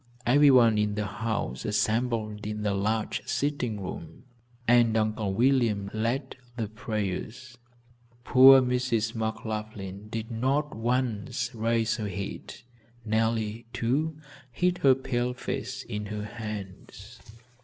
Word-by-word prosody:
Everyone 125 -4 +6
in 105 -1 0
the 105 0 -1
house 100 - -3
assembled 110 -1 -1
in 105 0 -4
the 105 -1 +1
large 105 +2 -1
sitting 130 -7 -1
room, 85 -1 -8 0.4
and 120 -2 +5
Uncle 110 -2 0
William 115 -3 +2
led 120 +5 -2 0.2
the 110 -3 -2
prayers. 110 +3 -4 0.7
Poor 130 +2 +8
Mrs. 125 -3 0
McLaughlin 110 -3 -4
did 110 +1 -5
not 135 +6 0
once 120 +1 -1
raise 115 0 0
her 105 -3 -3
head. 100 0 -6 0.4
Nellie, 110 0 0
too, 145 +7 0 0.3
hid 180 +6 0
her 135 -2 +5
pale 125 -1 -2
face 130 +1 -4
in 105 -2 -5
her 105 0 -4
hands. 105 -4 -8
115 Hz, 115 wpm, -27 LUFS, 105-125 Hz, 0.7 s, Poor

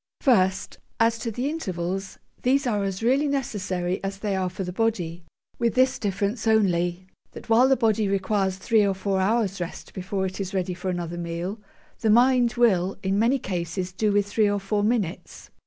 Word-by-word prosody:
First, 190 -8 +2 0.2
as 230 0 +3
to 230 - -3
the 245 +5 -2
intervals: 195 - -3 0.2
these 270 +2 +2
are 210 -5 0
as 195 +1 -3
really 270 +5 +3
necessary 190 -10 -2
as 195 0 -3
they 200 -1 -2
are 185 -1 0
for 185 +2 -5
the 180 0 -5
body, 180 -6 -1 0.4
with 235 0 +1
this 260 +1 +3
difference 205 +2 -2
only, 180 -4 +2 0.3
that - - -11
while 235 +3 +6
the 270 0 +3
body 220 -3 +2
requires 195 -1 0
three 220 +2 +2
or 195 -1 +1
four 190 0 -1
hours' 200 -2 0
rest 170 - -7
before 190 +1 -3
it 185 +1 -5
is 195 +1 -4
ready 185 -1 -1
for 180 +1 -4
another 175 -1 -3
meal, 170 +5 -4 0.4
the 225 - +1
mind 245 +1 +4
will 195 -6 +2
in 195 +1 +1
many 240 +5 +3
cases 180 -3 -3
do 210 +3 +1
with 205 0 +2
three 205 +1 +2
or 205 0 0
four 205 +1 -1
minutes. 210 -5 -2
200 Hz, 190 wpm, -25 LUFS, 185-230 Hz, 0.4 s, while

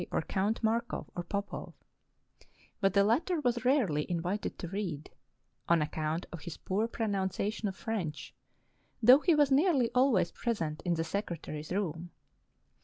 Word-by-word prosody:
or - - -1
Count 205 +4 -1
Markov, 230 +2 -1
or 175 - -2
Popov; 200 +3 -5 1.0
but 195 -1 +2
the 200 - +6
latter 320 - +2
was 240 -4 0
rarely 220 - +2
invited 180 +4 -2
to 175 - -5
read, 175 -6 -4 0.6
on 170 0 +5
account 155 +2 -2
of 170 - -7
his 170 - -7
poor 205 +4 -1
pronun 205 -5 -1
ciation 210 +4 -3
of 195 -2 -2
French, 185 -9 -4 0.7
though 250 +5 +9
he 335 +1 +3
was 290 -2 +4
nearly 275 -5 +3
always 250 -9 +3
present 165 -10 -2
in 175 -1 +2
the 165 - -1
secretary's 160 -4 -4
room. 175 -3 -2
200 Hz, 150 wpm, -31 LUFS, 170-235 Hz, 1.0 s, though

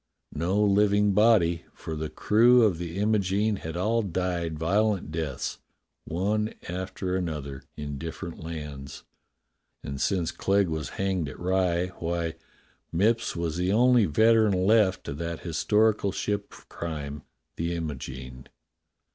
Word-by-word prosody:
No 90 +6 0
living 105 0 +4
body, 95 -5 +4
for 80 - -6
the 80 0 -3
crew 120 +7 +5
of 95 -7 +2
the 85 0 -5
Imogene 105 0 +1
had 80 -1 -6
all 110 +5 +1
died 90 -4 -2
violent 100 +2 +1
deaths 75 -5 -3 0.5
one 105 +6 -1
after 90 +1 -3
another 75 -7 -4 0.2
in 75 -2 -5
different 80 +2 -6
lands, 75 -4 -7 0.8
and 70 -1 -5
since 90 +1 +1
Clegg 100 -1 +1
was 80 -2 -3
hanged 95 -6 0
at - - -10
Rye, 90 -1 +1
why, 85 -1 -2 0.6
Mipps 110 +7 +1
was 85 -1 -2
the 90 +1 +1
only 120 +1 +5
veteran 110 +5 +4
left 105 -3 +3
of 70 +2 -5
that 85 0 -4
historical 105 +4 +2
ship 100 +1 -2
of - - -15
crime, 75 -4 -5 0.4
the 85 +1 -1
Imogene. 65 -5 -6
90 Hz, 130 wpm, -27 LUFS, 80-105 Hz, 0.8 s, crew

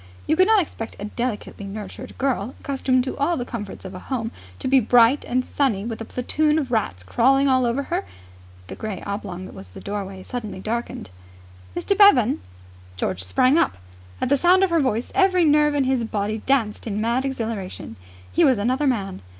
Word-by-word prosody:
You 315 - +2
could 370 +3 +4
not 440 -1 +5
expect 225 -7 -8
a 205 - -6
delicately 210 -2 -4
nurtured 215 +5 -8
girl, 260 -3 -1
accustomed 260 -2 +1
to 260 - -4
all 335 +5 +1
the 245 - -3
comforts 210 -6 -7
of 190 - -7
a 185 - -7
home, 230 -2 -3 0.3
to - - -4
be 265 0 +5
bright 245 +3 +4
and 255 +1 0
sunny 220 -8 0
with 225 -1 -5
a - - -4
platoon 300 +6 0
of 275 -5 -2
rats 145 - -1
crawling 270 - +3
all 255 -2 +3
over 250 +4 0
her.... - - -2 0.6
The - - -8
grey 215 -4 -5
oblong 200 -2 -5
that - - -11
was 95 -1 -10
the 90 - -11
doorway 195 -2 -5
suddenly 220 -5 -6
darkened. 225 - -4 0.7
"Mr. 400 - +1
Bevan!" 275 - +6 0.6
George 95 0 -2
sprang 255 - +3
up. 95 - +1 0.4
At - - -1
the 280 - +4
sound 360 +6 +5
of 380 - +2
her 335 - +3
voice 245 -3 -1
every 370 -3 +4
nerve 295 0 +4
in 285 - +2
his 260 -2 +1
body 215 -1 -2
danced 235 -6 +1
in 210 -1 -2
mad 235 +4 +1
exhilaration. 225 - -4 0.4
He - - +4
was 260 -4 +5
another 255 +8 +1
man. 195 - -1
240 Hz, 195 wpm, -23 LUFS, 205-275 Hz, 0.7 s, Bevan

